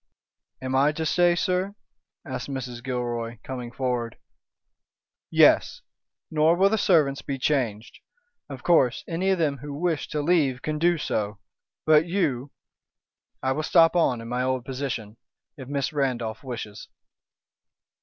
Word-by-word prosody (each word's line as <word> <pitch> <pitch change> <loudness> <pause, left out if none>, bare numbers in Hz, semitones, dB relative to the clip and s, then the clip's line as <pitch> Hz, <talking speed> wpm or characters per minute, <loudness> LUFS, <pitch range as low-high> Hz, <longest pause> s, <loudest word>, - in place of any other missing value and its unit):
"Am 130 0 -2
I 140 +3 +4
to 160 +1 -3
stay, 175 +2 +3
sir?" 185 +3 -1 0.5
asked 130 -2 -5
Mrs. 125 -3 -5
Gilroy, 120 -2 -3
coming 125 -2 -6
forward. 125 -3 -2 1.1
"Yes! - - +4 0.5
nor 155 +2 +4
will 195 +3 +4
the 220 - +2
servants 150 -8 +3
be 140 - -4
changed. 120 -6 -1 0.5
Of 135 -3 -8
course, 135 -8 +3
any 180 +3 -1
of 190 - +3
them 145 -5 0
who 145 +1 -7
wish 165 0 -1
to 150 -1 -2
leave 145 -6 +2
can 155 0 -2
do 175 +1 +3
so. 105 -7 -2 0.5
But 155 +1 +5
you 145 -8 -1 0.4
" - - -53
"I 130 - +1
will 150 - -1
stop 165 +2 +4
on 130 -9 +2
in 115 - -8
my 125 +1 -1
old 130 -1 -1
position, 125 -5 -4 0.4
if 130 -3 -10
Miss 140 +1 -2
Randolph 120 -6 -2
wishes." 115 -5 -7
135 Hz, 145 wpm, -25 LUFS, 125-160 Hz, 1.1 s, But